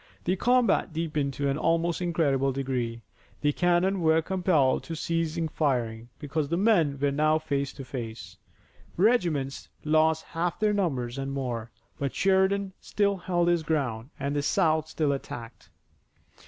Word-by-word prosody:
The 185 Hz, -, +1 dB
combat 240 Hz, -3 st, +2 dB
deepened 150 Hz, -4 st, -1 dB
to 140 Hz, -, -1 dB
an 140 Hz, +2 st, 0 dB
almost 165 Hz, +1 st, +1 dB
incredible 145 Hz, -6 st, +1 dB
degree. 125 Hz, -4 st, -3 dB, 0.4 s
The 145 Hz, -1 st, +2 dB
cannon 180 Hz, +3 st, +2 dB
were 160 Hz, 0 st, +4 dB
compelled 175 Hz, -7 st, +2 dB
to 165 Hz, -, -5 dB
cease 165 Hz, 0 st, -1 dB, 0.2 s
firing 120 Hz, -6 st, -1 dB
because 145 Hz, 0 st, -2 dB
the 170 Hz, -, 0 dB
men 175 Hz, -9 st, +3 dB
were 140 Hz, 0 st, +1 dB
now 155 Hz, +2 st, +3 dB
face 140 Hz, -3 st, -2 dB
to 135 Hz, -, -9 dB
face. 115 Hz, -8 st, -7 dB, 0.6 s
Regiments 170 Hz, -, +1 dB, 0.2 s
lost 155 Hz, +1 st, +3 dB
half 170 Hz, +1 st, -2 dB
their 215 Hz, -1 st, +2 dB
numbers 135 Hz, -11 st, -1 dB
and 135 Hz, 0 st, -3 dB
more, 120 Hz, -4 st, -3 dB, 0.3 s
but 140 Hz, -2 st, -2 dB
Sheridan 190 Hz, 0 st, +2 dB
still 200 Hz, -1 st, +1 dB
held 175 Hz, -2 st, 0 dB
his 175 Hz, -1 st, +3 dB
ground 135 Hz, -7 st, -2 dB
and 140 Hz, +1 st, -2 dB
the 145 Hz, -, +1 dB
South 155 Hz, 0 st, +2 dB
still 155 Hz, -2 st, 0 dB
attacked. 120 Hz, -4 st, -7 dB
155 Hz, 150 wpm, -27 LUFS, 135-175 Hz, 0.6 s, were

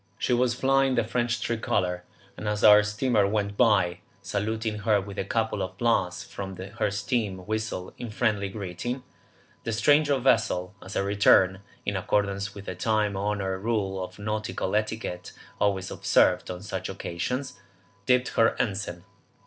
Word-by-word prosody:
She -, -, 0 dB
was 120 Hz, 0 st, +2 dB
flying 135 Hz, 0 st, +3 dB
the -, -, +2 dB
French 120 Hz, -1 st, -1 dB
Tricolor, 110 Hz, -6 st, -1 dB, 0.3 s
and 105 Hz, -, -6 dB
as 105 Hz, 0 st, -1 dB
our 105 Hz, 0 st, +9 dB
steamer 105 Hz, 0 st, +1 dB
went 100 Hz, -1 st, -1 dB
by, 100 Hz, -7 st, +3 dB, 0.2 s
saluting 110 Hz, +1 st, -2 dB
her 105 Hz, 0 st, +3 dB
with 100 Hz, 0 st, -7 dB
a -, -, 0 dB
couple 110 Hz, 0 st, -1 dB
of 95 Hz, 0 st, -4 dB
blasts 95 Hz, -7 st, +1 dB
from 95 Hz, -1 st, -7 dB
her 100 Hz, +5 st, -2 dB
steam 100 Hz, -2 st, -2 dB
whistle 110 Hz, -3 st, -3 dB
in 120 Hz, -, -5 dB
friendly 105 Hz, -3 st, 0 dB
greeting, 105 Hz, +6 st, -5 dB, 0.6 s
the 115 Hz, -, -2 dB
stranger 145 Hz, +5 st, +4 dB
vessel 105 Hz, -7 st, +1 dB
as 95 Hz, -, -9 dB
a -, -, +1 dB
return, 100 Hz, -1 st, +4 dB, 0.2 s
in 100 Hz, -, -1 dB
accordance 100 Hz, 0 st, -1 dB
with 100 Hz, -1 st, -9 dB
the -, -, -4 dB
time 105 Hz, +2 st, 0 dB
honoured 95 Hz, -1 st, -1 dB
rule 100 Hz, -4 st, -1 dB
of 90 Hz, -, -9 dB
nautical 105 Hz, -2 st, -2 dB
etiquette 105 Hz, -4 st, -2 dB, 0.3 s
always 95 Hz, -2 st, 0 dB
observed -, -, +3 dB
on 90 Hz, +1 st, -6 dB
such 105 Hz, -, -4 dB
occasions, 125 Hz, +8 st, -4 dB, 0.5 s
dipped 125 Hz, 0 st, +3 dB
her 115 Hz, 0 st, +3 dB
ensign. 95 Hz, -4 st, -2 dB
105 Hz, 155 wpm, -27 LUFS, 95-115 Hz, 0.6 s, our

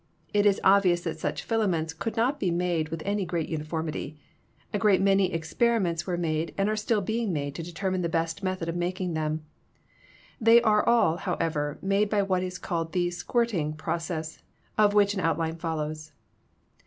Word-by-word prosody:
It 205 Hz, 0 st, +4 dB
is 200 Hz, -, +3 dB
obvious 190 Hz, -3 st, +5 dB
that -, -, -4 dB
such -, -, -3 dB
filaments 180 Hz, -8 st, 0 dB
could 225 Hz, +8 st, -4 dB
not 260 Hz, +6 st, +1 dB
be 190 Hz, -, +1 dB
made 170 Hz, -2 st, 0 dB
with 165 Hz, -1 st, -5 dB
any 200 Hz, 0 st, 0 dB
great 170 Hz, -3 st, -2 dB
uniformity. 155 Hz, -1 st, -4 dB, 0.6 s
A 205 Hz, -, 0 dB
great 205 Hz, -4 st, +4 dB
many 195 Hz, -1 st, +3 dB
experi 230 Hz, +9 st, +1 dB
ments 170 Hz, -4 st, -1 dB
were 180 Hz, -2 st, -1 dB
made 160 Hz, -1 st, -2 dB
and 195 Hz, 0 st, +2 dB
are 215 Hz, -, 0 dB
still 215 Hz, 0 st, 0 dB
being 220 Hz, +1 st, -1 dB
made 145 Hz, -3 st, -2 dB
to 165 Hz, -, -5 dB
determine 185 Hz, +2 st, -2 dB
the 170 Hz, -, -1 dB
best 165 Hz, +1 st, -1 dB
method 185 Hz, -3 st, -2 dB
of 165 Hz, -, -2 dB
making 180 Hz, 0 st, -2 dB
them. 155 Hz, 0 st, -2 dB, 0.9 s
They 230 Hz, +1 st, +7 dB
are 210 Hz, -2 st, +4 dB
all, 225 Hz, -9 st, +3 dB
however, 160 Hz, -5 st, -2 dB
made 200 Hz, +2 st, +2 dB
by 205 Hz, -1 st, +2 dB
what 185 Hz, -2 st, 0 dB
is 180 Hz, 0 st, -4 dB
called 165 Hz, -2 st, -3 dB
the 175 Hz, -1 st, +1 dB
"squirting" 180 Hz, -5 st, -1 dB
process, 160 Hz, 0 st, -4 dB, 0.3 s
of 210 Hz, -1 st, +4 dB
which 205 Hz, -1 st, +4 dB
an 200 Hz, -, -3 dB
outline 165 Hz, -1 st, 0 dB
follows. 155 Hz, -2 st, -4 dB
175 Hz, 180 wpm, -27 LUFS, 160-200 Hz, 0.9 s, They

